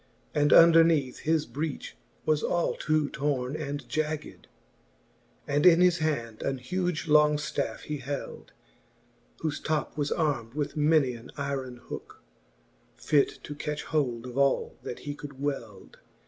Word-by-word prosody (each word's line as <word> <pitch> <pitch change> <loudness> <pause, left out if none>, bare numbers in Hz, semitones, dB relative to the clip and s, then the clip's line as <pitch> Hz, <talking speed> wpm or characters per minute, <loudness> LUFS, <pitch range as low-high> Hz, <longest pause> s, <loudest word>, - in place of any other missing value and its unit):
And 145 0 +2
underneath 165 -5 +6
his 160 -1 +1
breech 150 - -5 0.3
was 155 -1 +2
all 175 -1 0
ta 155 0 +1
torne 135 -2 -1
and 145 -2 -5
jagged: 155 0 -3
XI. - - -35 1.0
And 145 +1 +1
in 175 -2 +7
his 180 -1 +4
hand 120 -8 -2
an 135 -1 -1
huge 175 +6 -2
long 150 0 +5
ftafFe 150 - -3
he 150 - -4
held, 140 +1 -6 0.9
Whofe 155 -2 -2
top 155 -1 -1
was 145 -1 0
arm'd 140 -7 -1
with 150 0 -2
many 150 -4 +3
an 120 +1 -11
yron 135 -3 -3
hooke. - - -9 0.8
Fit 145 -2 +1
to 145 - -6
catch 145 0 -4
hold 125 -7 -1
of 125 +2 -4
all 140 -1 +2
that 120 - -7
he 145 - -4
could 145 -2 -10
weld. 120 -9 -5
145 Hz, 145 wpm, -28 LUFS, 135-155 Hz, 1.0 s, in